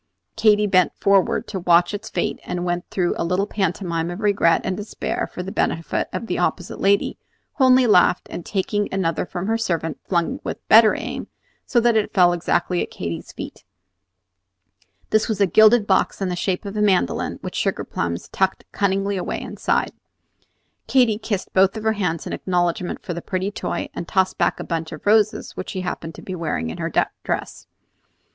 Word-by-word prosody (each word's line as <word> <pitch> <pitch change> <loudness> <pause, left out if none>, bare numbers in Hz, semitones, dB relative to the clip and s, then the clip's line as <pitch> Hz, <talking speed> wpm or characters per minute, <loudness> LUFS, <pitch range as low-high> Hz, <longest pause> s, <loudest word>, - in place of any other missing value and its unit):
Katy 210 -1 +4
bent 185 -3 +3
forward 195 -2 +2
to 195 - -3
watch 175 +1 +3
its 210 +2 -5
fate, - - -2
and 175 0 -3
went 175 0 -2
through 180 -2 0
a - - +1
little 180 +4 0
pantomime 175 -4 -2
of 175 +2 -6
regret 200 -5 +3
and 185 - -1
despair 210 +2 -4
for 180 - -5
the 190 - -6
benefit 165 -3 -1
of - - -4
the - - -2
opposite 180 -1 -2
lady, 200 +1 +2 0.4
who 265 - +4
only 255 0 +6
laughed, 180 -4 +4
and 175 - -5
taking 205 +2 -1
another 180 -2 -1
from 180 0 -4
her 225 +2 0
servant 165 -7 -2
flung 170 -3 0
with - - -6
better 220 0 +7
aim, - - -5 0.4
so 240 - +3
that 235 -1 +3
it 215 -1 0
fell 175 -2 +5
exactly 175 +1 0
at - - -3
Katy's 85 -2 -6
feet. - - -9 1.5
This 215 +1 +2
was 215 - -1
a 200 - +5
gilded 215 +4 +5
box 190 -2 +1
in 195 -2 -1
the 180 - -2
shape 180 +2 -2
of 200 +1 -6
a 210 - 0
mandolin, 190 - +1
with - - -5
sugar - - -1
plums 85 +1 -3
tucked 190 0 0
cunningly 200 0 0
away 180 - -3
inside. - - -1 1.0
Katy 240 -5 +3
kissed 205 -4 -3
both 190 +2 +4
her 220 0 0
hands 180 -6 -2
in - - -5
acknowledgment 175 -1 -1
for 175 - -4
the 170 - -5
pretty 190 +2 -2
toy, - - -3
and 170 - -6
tossed 190 -1 +1
back - - +1
a - - -4
bunch 165 -2 -3
of 155 - -9
roses 215 0 +2
which - - -6
she 185 - -4
happened 165 -3 -5
to - - -11
be 185 - -6
wearing 155 - -2
in - - -8
her - - -2 0.3
dress. - - -4
190 Hz, 190 wpm, -22 LUFS, 175-210 Hz, 1.5 s, better